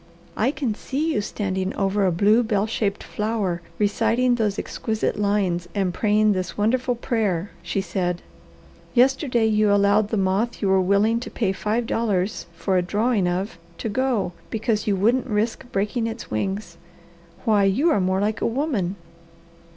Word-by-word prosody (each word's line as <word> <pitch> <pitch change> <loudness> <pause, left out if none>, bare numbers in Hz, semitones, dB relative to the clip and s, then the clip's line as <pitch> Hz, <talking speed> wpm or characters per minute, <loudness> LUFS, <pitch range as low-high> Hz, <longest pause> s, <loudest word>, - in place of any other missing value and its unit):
"I 225 - +2
can 270 -5 -1
see 295 +8 -2
you 210 - +1
standing 190 -2 -3
over 195 0 +1
a - - +2
blue, 210 +7 +4
bell 210 -3 +1
shaped 210 -2 -2
flower 210 -5 -2 0.2
reciting 235 +4 +2
those 215 -4 0
exquisite 220 -2 -2
lines 190 -4 0
and 190 -3 0
praying 215 +1 +3
this 185 -1 -4
wonderful 245 +4 +1
prayer," 210 -7 -1
she 175 +3 -2
said. 180 -1 -2 0.7
"Yesterday 250 -1 +3
you 215 -1 +3
allowed 205 +1 +4
the 220 - -1
moth 195 +5 0
you 200 - 0
were 190 0 +4
willing 200 +5 +2
to 245 - -7
pay 205 -5 0
five 215 +5 -1
dollars 215 -5 -1
for 185 +3 0
a - - +3
drawing 205 +2 +1
of, 185 +4 -2 0.2
to 225 - -3
go, 240 -5 0 0.2
because 220 -1 -1
you 205 - +3
wouldn't 235 +8 +2
risk 225 +3 -2
breaking 210 +4 -1
its 225 +1 -7
wings. 190 - -3 0.7
Why 210 -3 +4
you 270 - +3
are 205 - +2
more 185 +1 +1
like 210 +1 -1
a - - +2
woman!" 230 - -1
210 Hz, 165 wpm, -23 LUFS, 195-230 Hz, 0.7 s, blue